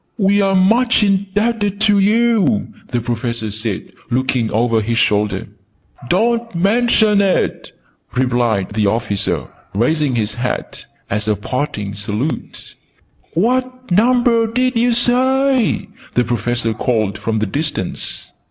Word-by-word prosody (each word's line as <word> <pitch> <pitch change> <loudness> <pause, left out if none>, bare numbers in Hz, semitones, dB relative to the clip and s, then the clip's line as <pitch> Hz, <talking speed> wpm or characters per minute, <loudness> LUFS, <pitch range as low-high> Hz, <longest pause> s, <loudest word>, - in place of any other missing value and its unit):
"We 200 -1 +3
are 195 -1 +2
much 225 +5 +3
indebted 200 +1 0
to 205 -2 +4
you!" 215 - +2 0.2
the 120 -2 -1
Professor 115 -2 -3
said, 110 -2 -4 0.2
looking 125 -2 0
over 115 0 +1
his 115 +2 -1
shoulder. 105 -3 +1 0.6
"Don't 230 +3 +1
mention 210 +2 +3
it!" 195 -2 0 0.4
replied 120 -6 +1
the 105 -1 +1
officer, 100 -1 -1 0.3
raising 140 +4 +1
his 105 -2 -1
hat 125 +3 -4 0.2
as 105 +1 -2
a 105 - +2
parting 105 -2 -3
salute. 105 +8 -4 0.6
"What 255 +4 -1
number 235 +3 +3
did 255 +1 +1
you 240 +1 +2
say!" 255 +1 +2 0.3
the 125 - +3
Professor 120 0 -1
called 110 -3 -1
from 110 +1 -2
the 110 - 0
distance. 145 - -3
150 Hz, 120 wpm, -17 LUFS, -, 0.6 s, to